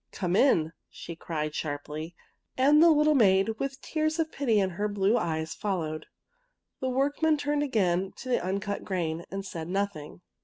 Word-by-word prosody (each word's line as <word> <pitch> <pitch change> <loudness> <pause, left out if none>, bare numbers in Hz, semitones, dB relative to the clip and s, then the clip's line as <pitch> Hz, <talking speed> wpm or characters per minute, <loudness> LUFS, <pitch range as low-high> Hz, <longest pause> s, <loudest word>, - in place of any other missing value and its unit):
'' - - -51
Come 180 -2 -1
in! 165 - +3
" - - -55
she 170 - -9
cried, 155 -2 -4
sharply, 155 +2 -5 0.4
and 290 +4 +5
the 340 - +8
little 305 -1 +4
maid, 215 -3 +3
with 275 0 -3
tears 310 0 -1
of 320 -1 -1
pity 235 -7 +1
in 190 -1 +1
her 205 +4 -2
blue 205 +1 +1
eyes, 160 -7 -1
followed. 160 -6 -3 0.7
The 260 - -1
workmen 285 +4 +1
turned 290 0 0
again 195 -9 +1
to 255 - -9
the 245 - +1
uncut 200 +2 -2
grain, 170 -4 -2
and 195 0 -5
said 165 -5 -6
noth 200 +1 -1
ing. 150 +3 -10
200 Hz, 185 wpm, -28 LUFS, 170-270 Hz, 0.7 s, the